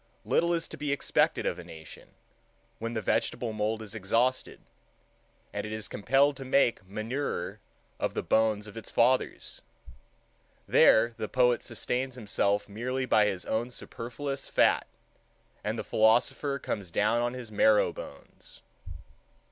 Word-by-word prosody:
little 170 +1 +2
is 170 -1 0
to - - -9
be 145 0 -2
expected 140 - +1
of - - -1
a - - -7
nation, 80 -1 -12 0.6
when 115 +1 -4
the 110 - -2
vegetable 115 +3 0
mould 110 +1 -1
is 105 -1 -9
exhausted, 115 +5 0 0.9
and - - -3
it 105 - -6
is 110 -2 -4
compelled 135 +7 +2
to 135 - -7
make 130 -5 +2
manure 115 +8 -3 0.4
of - - -2
the - - -1
bones 110 -2 +2
of 105 - -12
its 115 - -8
fathers. 125 +2 +1 1.1
There 115 +2 +5
the 110 - -4
poet 125 -1 +3
sustains 130 +1 -3
himself 105 -3 0
merely 125 +5 -3
by 110 -4 +4
his 95 -3 -3
own 115 +3 -1
superfluous 135 +3 -6
fat, - - +3 0.8
and - - -2
the - - -3
philosopher 120 +5 +2
comes 100 -8 -4
down 105 +7 +2
on 120 +1 -1
his 120 -3 -8
marrow 105 0 +4
bones. - - -11
115 Hz, 145 wpm, -29 LUFS, 105-130 Hz, 1.1 s, There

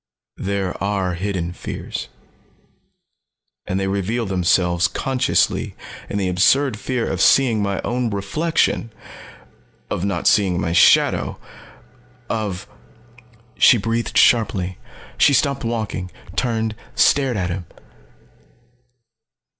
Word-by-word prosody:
There 95 -2 -2
are 100 -3 -1
hidden 90 -1 -3
fears. - - -6 1.6
And 95 - -1
they 95 - -1
reveal 100 +5 -1
themselves 90 -2 +2
consciously 130 -2 0 0.3
in - - -3
the 95 -2 0
absurd 110 +8 +3
fear 125 -1 -2
of - - -2
seeing 120 -6 +4
my 100 -1 -1
own 125 -1 -1
reflection. 115 +5 -1 1.0
Of 85 - -2
not 100 -4 -2
seeing 95 -6 +3
my 85 - -1
shadow. - - +4 0.9
Of 105 -5 -3 0.5
" 120 -1 -27
She 125 - +7
breathed 115 +2 -2
sharply. 95 -6 +2 0.4
She 140 - +5
stopped 140 0 +1
walking, 110 -5 -3 0.3
turned, 110 -3 -1 0.2
stared 135 -5 +3
at 90 -2 -2
him. 90 -2 -5
105 Hz, 105 wpm, -20 LUFS, 95-120 Hz, 1.6 s, She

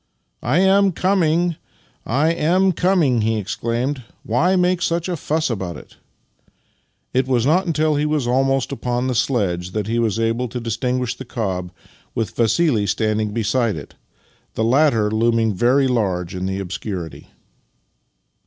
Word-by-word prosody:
" - - -49
I 125 +8 +1
am 195 0 +4
coming, 175 -2 +1 0.5
I 145 +7 +2
am 180 +4 +2
coming," 170 - +2
he 110 +1 +1
exclaimed. 120 +6 -2
" - - -40
Why 180 +10 +3
make 180 0 +2
such 170 0 0
a 180 - -1
fuss 155 0 -1
about 95 -7 -4
it? - - -15 0.6
" - - -44
It 130 +1 +1
was 125 -3 +1
not 175 +6 +2
until 155 -2 +1
he 150 +1 +1
was 150 -4 0
almost 135 +2 +1
upon 125 -2 -2
the 130 - 0
sledge 95 -8 -1
that 105 -2 -1
he 115 +2 -1
was 115 -2 0
able 115 +2 0
to 125 +2 -5
distinguish 125 +2 -2
the - - -8
cob, 95 -7 -3 0.5
with 115 -2 -2
Vassili 115 -1 +2
stand 110 +2 0
ing 105 - -1
beside 115 +1 0
it 75 -3 -9 0.3
— - - -37
the 110 - 0
latter 115 -4 +3
looming 115 0 +2
very 125 +7 +3
large 95 -8 -1
in 95 0 -3
the 95 0 -2
obscurity. 90 -2 -6
120 Hz, 165 wpm, -20 LUFS, 110-155 Hz, 0.6 s, am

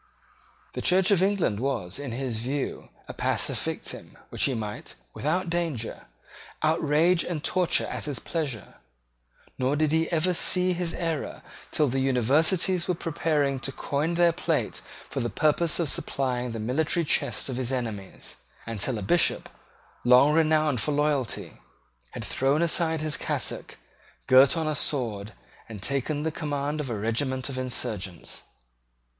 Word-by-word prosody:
The - - -4
Church 185 +2 +3
of 190 -3 +4
England 190 - +1
was, 120 -7 -2
in 140 -3 -5
his 120 -2 -2
view, 135 +4 -3 0.2
a - - -6
passive - - 0
victim, - - -4
which - - +1
he 135 - 0
might, 105 -2 -5 0.2
without 180 +5 -1
danger, 165 -9 -3 0.6
outrage 160 +2 +3
and 160 -4 -4
torture 180 -1 +2
at - - -4
his 145 -4 -3
pleasure; 140 - -4 0.8
nor 130 +2 +1
did 155 0 +1
he 160 +2 +1
ever 170 +2 +2
see 180 +1 +3
his 175 -1 -2
error 165 -4 -3 0.3
till 150 - +2
the 135 +1 0
Universities 155 - +2
were 180 - +1
preparing 150 -4 0
to 135 - -4
coin 150 +5 -1
their 175 0 +5
plate 165 - -1 0.3
for 135 - -4
the 120 -2 -1
purpose 155 +4 +2
of 170 - +1
supplying 125 -3 -1
the 115 - -5
military 155 +9 0
chest - - 0
of 130 -2 -3
his 130 -1 -1
enemies, 110 -7 -5 0.3
and 115 -2 -5
till 120 +4 0
a 105 - -4
Bishop, 170 - +2 0.5
long 125 +4 +6
renowned 155 -5 +3
for 150 - 0
loyalty, 145 -4 -1 0.5
had - - -5
thrown 140 +5 +1
aside 160 -1 +1
his 155 -1 0
cassock, - - -2 0.5
girt 130 +4 +6
on 160 -1 0
a 155 - +1
sword, 110 -8 0 0.4
and 110 -2 -7
taken 140 +3 0
the 160 - 0
command 150 -1 -2
of 135 - -5
a 115 - -2
regiment 130 +5 -1
of 135 - -5
insurgents. 110 -8 -3
145 Hz, 155 wpm, -27 LUFS, 125-160 Hz, 0.8 s, long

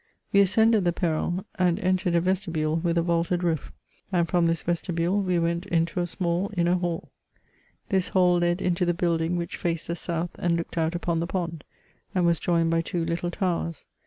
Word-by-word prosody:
We 200 - +6
ascended 215 +2 +4
the 175 -1 +1
perron, 175 +2 -1
and 180 -2 +2
entered 185 -1 +1
a 170 - +4
vestibule, 170 -4 0
with 170 0 0
a 170 - +3
vaulted 170 +1 0
roof; 165 -4 -1 0.4
and 175 -2 +2
from 175 0 +2
this 165 -1 0
vesti 175 +1 -2
bule 175 +5 +1
we 180 -2 +1
went 170 +2 -1
into 170 +1 0
a 175 - 0
small 175 +2 -1
inner 175 0 +3
hall. 175 -2 -3 0.8
This 190 -3 +2
hall 180 -2 +3
led 175 +2 +1
into 180 0 +1
the 175 -1 +1
building 170 0 0
which 170 -1 -4
faced 170 -2 -2
the 170 - -1
south 170 0 -3
and 170 -1 +1
looked 170 +1 -5
out 165 0 0
upon 170 -1 -1
the 170 - -1
pond, 170 -5 -3 0.5
and 180 -2 +3
was 170 -1 +3
joined 165 -2 +1
by 165 0 +2
two 165 0 -2
little 170 +1 -2
towers. 175 -4 -2
175 Hz, 200 wpm, -26 LUFS, 165-180 Hz, 0.8 s, We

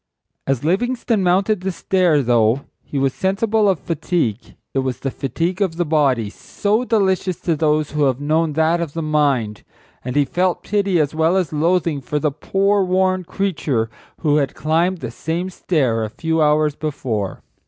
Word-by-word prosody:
As 135 -2 0
Livingstone 230 +5 0
mounted 190 +2 +2
the 190 +1 -2
stair, 175 -4 +2
though 120 +1 +3 0.2
he 145 - -6
was 135 -1 +1
sensible 210 +2 +1
of 185 -5 +1
fatigue 145 - -2 0.2
it 135 - +1
was 130 -2 -2
the 135 0 -3
fatigue 170 - -2
of 185 -5 +1
the 175 - +1
body, 140 -8 +2
so 210 - -1
delicious 190 -6 +1
to 165 - 0
those 155 0 +1
who 150 -1 +1
have 130 -2 +1
known 155 +2 +1
that 160 +2 +2
of 160 -4 -4
the 165 - -3
mind. 140 -9 +1 0.4
And 125 +1 -4
he 145 -1 +4
felt 180 +6 0
pity 200 -4 +1
as 150 -1 +1
well 160 +4 +2
as 180 -4 -1
loathing 165 -1 +1
for 150 +3 -3
the 150 0 0
poor, 195 +7 +1
worn 185 0 +1
creature 150 - -1 0.3
who 150 -2 +3
had 140 -3 0
climbed 165 +3 0
the 120 - -5
same 170 +9 -3
stair 130 -12 0
a 110 - -3
few 160 +7 -1
hours 150 0 +3
before. 125 -10 -3
160 Hz, 175 wpm, -20 LUFS, 140-185 Hz, 0.4 s, he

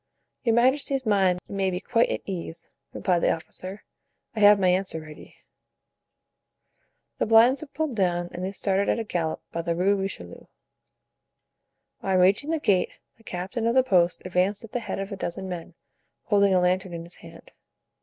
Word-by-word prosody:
"Your 230 -3 +2
majesty's 265 +2 +2
mind 190 -4 +2
may 195 -1 -1
be 180 -1 -3
quite 230 +4 +1
at - - -3
ease," 170 -3 -6 0.2
replied 180 -2 0
the - - +2
officer; 185 +4 -6 0.5
"I - - -3
have 205 -1 +7
my 185 - +2
answer 185 -2 0
ready." 155 -1 -13 1.8
The - - +1
blinds 230 +5 +5
were 310 - -7
pulled 310 -3 -3
down 175 -3 0
and 180 - -6
they 190 - -2
started 195 0 0
at - - +2
a 230 - -2
gallop 170 -6 -3
by 170 - -3
the 170 0 -2
Rue 190 +4 +2
Richelieu. 190 - -6 1.5
On 190 -1 +1
reaching 195 +11 +3
the 325 - +1
gate 195 - +2 0.3
the 225 - -23
captain 195 +5 -3
of 235 - +1
the 260 - +5
post 180 -8 +2
advanced 185 +3 0
at 225 - -11
the 245 - -2
head 230 - -5
of 195 +1 -5
a - - -3
dozen 190 0 -5
men, 175 -3 -7 0.5
holding 200 -2 +3
a - - +5
lantern 185 +1 0
in 165 - -6
his 170 +1 -10
hand. - - -14
195 Hz, 180 wpm, -25 LUFS, 180-225 Hz, 1.8 s, have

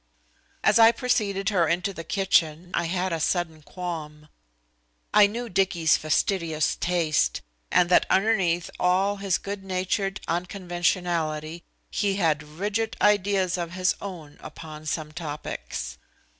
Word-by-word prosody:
As - - +5
I 225 0 +8
preceded 205 -6 0
her 180 -6 +2
into 180 +4 0
the 165 - -7
kitchen 175 -3 +1
I 175 - 0
had 180 +1 -1
a 165 - -1
sudden 160 -1 -1
qualm. 155 -3 -7 0.8
I 210 -1 +7
knew 235 +4 -5
Dicky's 180 -5 +2
fastidious 160 0 0
taste, 160 - +1 0.3
and 175 - +4
that 180 - +4
underneath 190 -4 +2
all 190 +3 +2
his 195 -3 0
good 200 0 -6
natured 195 +1 -1
unconventionality 175 -3 -1 0.3
he 200 -1 0
had 160 -6 +1
rigid 205 +9 -3
ideas 195 -3 +2
of 170 -1 -4
his 185 0 +2
own 165 -7 -8
upon 155 -1 -9
some 155 0 -3
topics. 150 - -6
180 Hz, 130 wpm, -25 LUFS, 160-195 Hz, 0.8 s, I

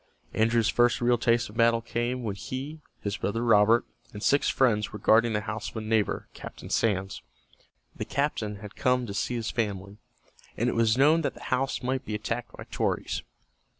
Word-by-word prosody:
Andrew's 115 0 +2
first 120 +6 +3
real 120 -1 +2
taste 120 0 +2
of 105 - -13
battle 115 0 +4
came 120 +2 -2
when 105 -3 -2
he, 135 +9 -6 0.2
his 100 -1 -3
brother 115 +4 -2
Robert, 115 +1 +5 0.3
and 105 0 -8
six 140 - +3
friends 110 -5 +2
were - - -6
guarding 115 +2 +4
the 105 - 0
house 110 +2 -4
of - - -10
a - - -2
neighbor, 110 -1 0
Captain - - -10
Sands. 95 -3 0 0.7
The - - -4
captain 125 -7 -1
had 105 0 -10
come 125 -2 +1
to 100 - -6
see 120 +4 -1
his 115 -1 -2
family, 100 -3 -3 0.6
and 120 +2 +1
it - - -1
was 115 0 +2
known 155 +5 +5
that 145 - -2
the - - -12
house 130 +1 -1
might 130 +1 -1
be 110 - -4
attacked 115 +3 -4
by - - -7
Tories. - - -1
115 Hz, 190 wpm, -27 LUFS, 105-125 Hz, 0.7 s, Robert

